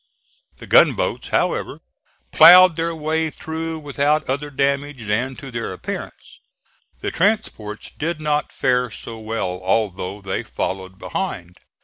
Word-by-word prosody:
The - - -11
gunboats, - - +3
however, - - -1 0.5
ploughed 180 -1 +9
their 165 0 -2
way 160 +1 -1
through 160 +1 -5
without 145 0 0
other 140 +3 -2
damage 140 -2 -1
than 120 +6 -1
to 135 0 -10
their 115 -4 -4
appearance. 90 - -8 0.6
The - - -2
transports 165 - -1
did 160 +1 -3
not 150 -1 -1
fare 125 -1 +1
so 115 +1 -8
well 110 -5 -3
although 95 -1 -1
they 95 -1 -3
followed 95 0 -5
behind. 90 - -5
135 Hz, 125 wpm, -21 LUFS, 105-160 Hz, 0.6 s, ploughed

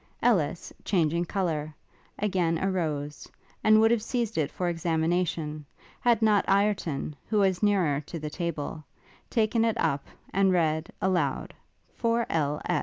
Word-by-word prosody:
Ellis, 180 -8 +1
changing 170 -2 +1
colour, 160 -5 -2 0.4
again 185 -5 +1
arose; 155 -6 -2 0.3
and 215 0 +6
would 225 +1 +5
have 235 -2 +2
seized 230 -1 -2
it 150 -2 +1
for 180 - -3
examination, 165 -2 -1 0.4
had 235 -2 +3
not 210 -2 +4
Ireton, 195 -8 +1
who 215 - 0
was 190 -3 +2
nearer 185 -9 +2
to 170 - -5
the 155 -1 -5
table, 160 -3 -4 0.5
taken 225 0 +2
it 230 0 +1
up, 140 -9 0 0.3
and 195 0 +4
read, 160 -2 +1
aloud, 175 -8 0 0.4
"For 230 0 +1
L. 150 -2 0
175 Hz, 135 wpm, -27 LUFS, 155-210 Hz, 0.5 s, and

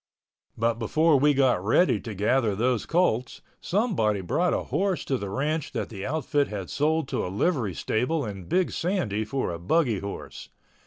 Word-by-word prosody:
But 115 0 0
before 155 +6 +3
we 145 +1 +4
got 130 -9 +3
ready 145 - +3
to 110 -4 -7
gather 110 +1 +1
those 120 +2 0
colts, 130 -9 0 0.2
somebody 170 - +1
brought 90 - +1
a - - 0
horse 185 +6 -1
to 135 - 0
the 100 - -5
ranch 150 +7 -2
that 110 -5 -3
the 100 -1 -6
outfit 145 0 0
had 100 -4 -6
sold 155 0 +1
to - - -1
a - - -3
livery 105 - 0
stable 140 +6 -1
in 100 -4 -7
Big 185 - +1
Sandy 165 - -1
for 120 0 -2
a 85 - -5
buggy 115 - +1
horse. 100 +1 -7
125 Hz, 175 wpm, -26 LUFS, 105-155 Hz, 0.2 s, we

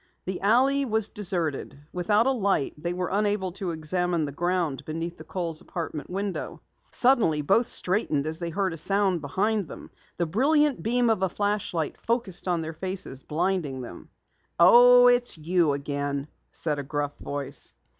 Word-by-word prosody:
The 185 0 -4
alley 260 +7 +3
was 220 -4 0
deserted. 170 -10 -2 0.2
Without 205 +5 +2
a 270 - +3
light 200 - 0
they 170 +3 -4
were 180 0 -3
unable 205 -2 0
to 190 0 -4
examine 170 +1 -1
the 145 - -5
ground 175 -2 -1
beneath 165 +2 -5
the 155 - -10
Kohl's 165 -1 -4
apartment 160 -4 -6
window. 195 +1 -4 0.3
Suddenly, 230 - +2
both 230 +11 +3
straightened 180 -10 0
as 160 +1 -3
they 170 -1 -3
heard 190 +1 -1
a - - -7
sound 195 0 +2
behind 195 +6 0
them. - - -11 0.3
The 170 - +1
brilliant 280 - +2
beam 240 +1 +2
of 215 -4 0
a 190 - +2
flashlight 205 -5 -2
focused 230 -6 -2
on 175 -2 +1
their 160 0 -5
faces, 185 -6 -4
blinding 160 -4 -1
them. 120 -8 -10 0.5
"Oh, 245 +7 +8
it's 245 -4 +3
you 165 -1 +1
again," 140 0 -3 0.2
said 150 -3 0
a - - -3
gruff 145 0 -3
voice. 140 -1 -5
180 Hz, 165 wpm, -26 LUFS, 155-210 Hz, 0.5 s, Oh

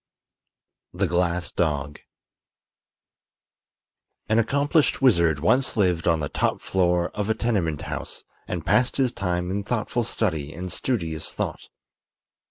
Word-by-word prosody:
THE 95 +3 0
GLASS 90 0 0
DOG 75 -3 -1 2.3
An 110 +1 +3
accomplished 140 +6 +2
wizard 85 - +4
once 125 - +2
lived 90 -5 +2
on 80 -2 +3
the 75 - -1
top - - 0
floor 90 -2 +1
of 105 0 -3
a 110 - +2
tenement 95 -11 -1
house - - -5 0.2
and - - -4
passed 125 0 +2
his 130 -3 +2
time 90 -4 -2
in 100 +1 -2
thoughtful 120 +2 -1
study 80 -10 -2
and 90 +1 -5
studious 85 -11 -2
thought. - - -4
90 Hz, 125 wpm, -24 LUFS, 85-115 Hz, 2.3 s, wizard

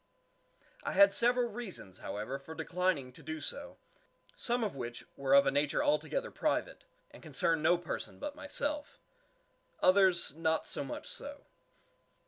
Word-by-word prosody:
I - - -2
had 200 +1 +7
several 240 +2 +3
reasons, 195 - -8
however, 110 +7 -4
for 160 +4 -10
declining 180 -9 0
to 160 - -14
do 155 +1 -5
so, 280 - -4 0.6
some 240 - 0
of 205 -9 -2
which 120 -2 -6
were 140 0 +3
of 140 0 +7
a 135 - +3
nature 145 - +1
altogether - - 0
private, - - -1 0.3
and - - -13
concern 165 -2 0
no 175 +3 +5
person 170 0 -5
but 295 0 -5
myself; 295 0 -2 0.8
others 185 -5 +4
not 160 0 +1
so - - -3
much 135 - -6
so. 285 0 -7
175 Hz, 145 wpm, -33 LUFS, -, 0.8 s, had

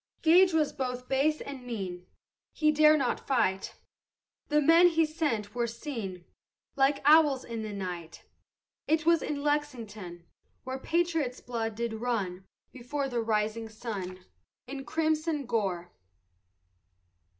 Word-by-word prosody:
Gage 360 +3 +6
was 315 -3 +1
both 250 -1 -4
base 285 +3 +1
and 275 -2 -7
mean, 190 -7 -5 0.5
He 305 -1 +3
dare 305 0 +6
not 265 -4 -1
fight, 195 -8 0 0.7
The 300 -1 +3
men 330 +4 +6
he 325 -2 +3
sent 290 -10 -2
were 240 -1 0
seen 225 - -6 0.5
Like 275 0 +2
owls 295 -3 +5
in 230 -1 -5 0.2
night: 175 -4 -6 0.6
It 315 0 +1
was 335 -1 +4
in 285 -1 -3
Lexington 225 - -3 0.4
Where 260 +1 -5
patriots' 325 -5 0
blood 225 -3 -3
did 235 0 -2
run 195 -7 -2 0.3
Before 270 +3 -3
the 240 -2 -1
rising 220 0 -1
sun 190 -5 -6 0.4
In 270 +1 -7
crimson 310 0 0
gore. 190 -7 -2
250 Hz, 125 wpm, -29 LUFS, 215-300 Hz, 0.7 s, Gage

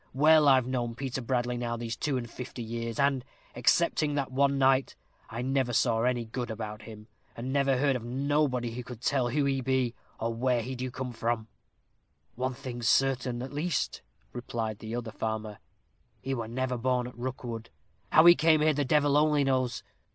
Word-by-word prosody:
Well, 155 +2 +6
I've 130 -3 +5
known 120 -2 -2
Peter 130 +1 -4
Bradley 120 0 -1
now 120 -1 -2
these 115 -1 -4
two 145 -3 -1
and 120 -1 -4
fifty 125 0 -7
years, 115 0 -4
and, 140 -2 +2 0.3
excepting 145 -1 +2
that 140 -2 -1
one 140 +1 +2
night, 135 0 +3 0.3
I 115 +3 -4
never 130 -2 0
saw 115 -1 +2
any 120 -1 +1
good 120 +2 -4
about 110 -1 -5
him, 105 -1 -11 0.3
and 125 +3 -4
never 140 -2 +2
heard 140 0 +2
of 120 - -4
nobody 130 -1 0
who 125 +2 -6
could 120 -1 -10
tell 130 -2 +1
who 145 +3 +1
he 135 -1 0
be, 130 -2 0 0.3
or 115 +1 -1
where 120 0 +1
he 130 - -5
do 130 0 -4
come 125 0 -5
from." 115 -1 -2 0.8
"One 130 +1 -2
thing's 120 -4 -3
certain, 125 -2 +1
at 135 - -7
least," 160 +4 -1 0.3
replied 115 -3 -4
the 110 +1 -5
other 120 -2 -4
farmer 110 -1 -4 0.6
"he 135 - -3
were 115 -4 -3
never 125 +1 -2
born 125 0 +1
at 125 - -9
Rookwood. 120 -2 -5 0.4
How 160 - +7
he 175 - +11
came 160 -2 +3
here 155 0 +4
the 145 0 0
devil 145 +1 +3
only 150 -1 +4
knows. 130 -3 0
125 Hz, 190 wpm, -29 LUFS, 120-135 Hz, 0.8 s, he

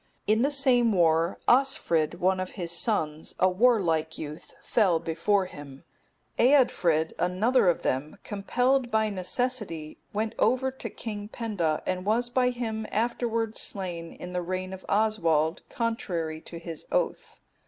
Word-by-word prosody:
In 220 +2 +3
the 275 - +3
same 260 -5 +3
war 165 -1 +3
also, 270 +4 +4
Osfrid,(272) 160 - 0
one 185 +1 +2
of 185 0 -3
his 170 -3 -5
sons, 160 -5 -1
a 185 - +5
warlike 180 -7 +2
youth, 150 0 -8
fell 195 -7 +2
before 170 +5 +1
him; 145 -6 -11 0.6
Eadfrid,(273) 190 - +3
another 190 +5 +3
of 175 - 0
them, 135 +4 -1
compelled 245 +5 0
by 220 -2 +1
necessity, 190 -5 -2
went 220 +2 -2
over 260 +1 +2
to 265 - -7
King 210 -2 -6
Penda, 205 -9 -2
and 185 0 -2
was 235 +4 0
by 250 0 +3
him 225 -3 -3
afterwards 230 0 -1
slain 175 -4 -4
in 180 0 -9
the 180 - -1
reign 185 +1 -4
of 190 - -9
Oswald, 170 -7 +2
contrary 175 -9 -2
to 170 - -9
his 165 -1 -7
oath. - - -1
195 Hz, 145 wpm, -27 LUFS, 165-235 Hz, 0.6 s, a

